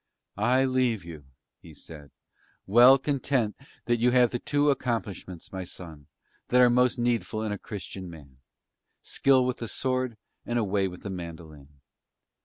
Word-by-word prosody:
"I 125 +5 +3
leave 125 -7 0
you," 80 -4 -10 0.4
he - - -14
said, 75 -3 -12 0.6
"well 120 +6 +7
content 135 -5 -1 0.3
that 120 0 +1
you 120 +2 +3
have 125 -1 +4
the 120 - -2
two 145 +2 +2
accomplishments, 105 - -4
my 95 -1 -4
son, 80 -5 -11 0.4
that 125 - +3
are 125 -1 +6
most 125 +1 +3
needful 120 -2 -1
in 110 - -2
a 105 - -4
Christian 95 -3 -8
man, 70 -6 -14 0.6
skill 130 -2 +3
with 125 -1 -2
the 115 - -5
sword 130 -1 -2 0.3
and 120 - -2
a 115 - +1
way 100 -1 0
with 90 -1 -10
the 100 - -5
mandolin. 80 -5 -10
115 Hz, 160 wpm, -27 LUFS, 90-125 Hz, 0.6 s, well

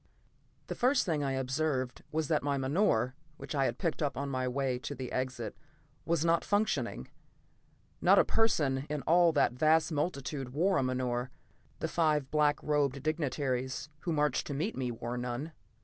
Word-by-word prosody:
The - - -4
first 255 +2 +2
thing 155 -5 0
I 135 -1 0
observed 130 -1 -1
was 155 -1 -1
that 155 -1 +2
my 140 -1 0
menore, 130 - +1 0.2
which - - -7
I 135 -2 +2
had 120 - -1
picked 165 - -2
up 145 -2 -1
on 140 +1 -2
my 130 -1 -1
way 130 -1 -1
to 145 - -5
the 130 -2 -6
exit, 130 -4 -3 0.5
was 170 -1 +1
not 165 0 +3
functioning. 205 +1 0 0.9
Not - - +6
a - - +6
person 150 -11 +1
in 150 -3 -3
all 170 +2 +5
that 120 - +3
vast 155 +5 +3
multitude 140 -4 -2
wore 185 +6 +2
a - - +2
menore; 130 -1 -1 0.5
the - - 0
five 150 -5 +1
black 150 -1 +3
robed 140 -3 0
dignitaries 140 -3 -1
who 170 - -3
marched 150 -3 +1
to 145 - -3
meet 175 +11 -2
me 125 -2 -2
wore 120 +1 -4
none. 125 +6 -4
140 Hz, 175 wpm, -31 LUFS, 130-155 Hz, 0.9 s, Not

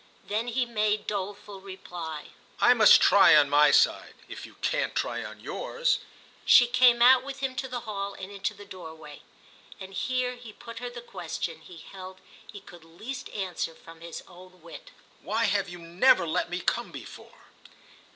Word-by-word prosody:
Then 210 +4 -3
he 245 +1 0
made 215 -2 -1
doleful 200 0 -5
reply: 175 -5 -8 0.3
"I - - +6
must - - +7
try - - +7
on 145 -2 +4
my 150 +1 +6
side—if - - 0
you - - -18
can't - - -1
try - - -2
on - - -10
yours." - - -1 0.4
She 245 - +7
came 240 0 +4
out 255 +1 +7
with 275 0 -8
him 265 -1 -2
to 265 - -3
the 250 -1 -5
hall 200 -3 -5
and 190 +1 -9
into 205 +2 -4
the 205 0 -12
doorway, 160 -6 -11 0.6
and 190 0 -10
here 255 +4 -1
he 235 -3 -12
put 230 +1 -10
her 245 0 -5
the 240 0 -9
question 165 -6 -6
he 175 +1 -13
held 185 +2 -11 0.3
he 205 - -11
could 175 -2 -15
least 220 +11 -8
answer 185 -5 -4
from 165 0 -15
his 170 -1 -8
own 185 -1 -16
wit. 170 - -12 0.3
"Why 220 +4 -1
have 200 -3 0
you 175 - -9
never 170 +5 +3
let 160 +1 -1
me 180 +1 -4
come - - -1
before?" - - -12
200 Hz, 175 wpm, -27 LUFS, 175-240 Hz, 0.6 s, must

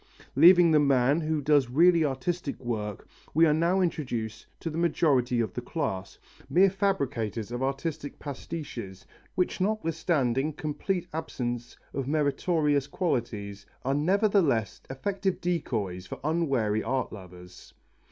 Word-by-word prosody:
Leaving 175 -1 +7
the 155 - +5
man 140 +2 +3
who 155 -1 -1
does 145 -3 +3
really 165 +5 +5
artistic 145 +3 -2
work 105 -5 -4 0.3
we 165 +1 +6
are 155 - +4
now 170 +4 +2
introduced 120 -11 -3
to 165 - -4
the 155 - -5
majority 140 -8 +2
of 115 - -1
the 125 - -4
class, 100 - -4 0.3
mere 190 +2 +5
fabricators 120 - -1
of 120 +1 -3
artistic 140 +2 -3
pastiches, 130 - -7 0.3
which 180 +1 0
notwithstanding 155 - 0
complete 165 +5 -3
absence 120 -7 -4 0.2
of 135 -2 -3
meritorious 150 -1 +1
qualities 115 - -3 0.2
are 135 - +1
nevertheless 170 - +2
effective 190 +8 -2
decoys 110 - -2
for - - -7
unwary 135 -10 +1
art 130 +2 -2
lovers. 90 -2 -12
145 Hz, 125 wpm, -28 LUFS, 120-170 Hz, 0.3 s, Leaving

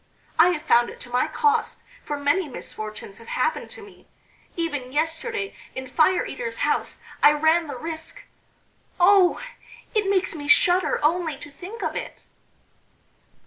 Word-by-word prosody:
I 335 +3 +8
have 320 -4 -2
found 240 -6 +4
it - - -11
to 245 - -9
my 250 +5 +2
cost, 440 +7 +1 0.2
for 295 - -4
many 290 +5 +1
misfortunes 215 -4 -8
have 230 - -14
happened - - -1
to 470 -3 -10
me. 410 - -16 0.5
Even 290 -7 -3
yesterday 330 - -2 0.2
in 260 - -5
Fire 320 +7 +3
eater's 475 -2 -5
house - - -1 0.2
I 295 - +7
ran 315 +2 +2
the 280 -3 -6
risk.... 320 +3 -6 0.8
Oh! 365 0 +5 0.5
it 420 -3 +1
makes 385 -2 +1
me 290 -3 -7
shudder 355 +5 +4
only 325 -2 +1
to 290 - -10
think 390 +10 -9
of - - -2
it." - - -7
325 Hz, 150 wpm, -24 LUFS, 290-380 Hz, 0.8 s, I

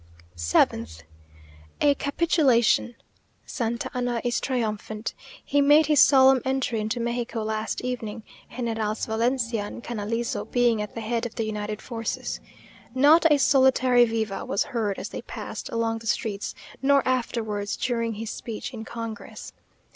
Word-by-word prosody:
7th. 85 -1 +1 0.8
A 290 -1 +5
capitulation. 280 -6 +2 0.5
Santa 235 -2 -2
Anna 245 -1 -1
is 240 -1 0
triumphant. 220 -3 -3 0.3
He 285 - +2
made 295 +2 +6
his 300 -1 +5
solemn 265 -2 +6
entry 265 -4 -1
into 220 +3 -2
Mexico 235 -1 -2
last 215 0 -2
evening, 230 -3 -4 0.3
Generals 225 -3 -2
Valencia 230 0 0
and 235 - -8
Canalizo 230 +1 -3
being 240 -3 +2
at 210 - -6
the 230 - -4
head 230 +2 -1
of 230 - -15
the 225 - -1
united 210 0 -4
forces. 230 -2 -4 0.6
Not 310 +5 +6
a 295 - +6
solitary 260 -3 +4
viva 220 -3 -2
was 195 - 0
heard 225 -8 -2
as - - -5
they - - -6
passed - - -7
along 225 0 -1
the 225 - -9
streets; 205 -1 -2 0.3
nor 275 0 +3
afterwards, 220 -5 -1
during 230 -3 -1
his 220 +1 -5
speech 230 +2 -6
in 220 -2 -6
congress. 230 0 -7
230 Hz, 140 wpm, -25 LUFS, 220-255 Hz, 0.8 s, made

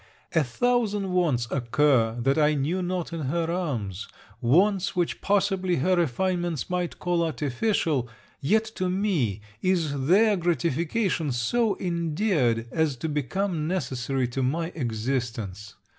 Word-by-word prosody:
A 160 - +4
thousand 210 - 0
wants 155 -10 +1
occur, 120 -2 +2
that 135 +3 +2
I 150 0 +4
knew 155 +7 0
not 180 -1 -3
in 165 - -3
her 165 +4 -1
arms 115 - -3 0.3
wants 190 - +3
which 175 -2 -1
possibly 195 -2 +1
her 185 +7 +2
refinements 175 +1 -1
might 180 -1 -2
call 175 -1 0
artificial; 150 - 0 0.3
yet, 215 +10 +2
to 185 0 0
me, 175 - 0 0.2
is 155 -7 0
their 205 +4 +5
gratification 170 - 0
so 200 - +1
endeared, 165 - 0
as 160 -4 +1
to 130 - -4
become 155 +3 -1
necessary 135 -6 -1
to 135 +2 -2
my 160 +6 0
existence. 115 - -3
165 Hz, 130 wpm, -26 LUFS, 130-185 Hz, 0.3 s, their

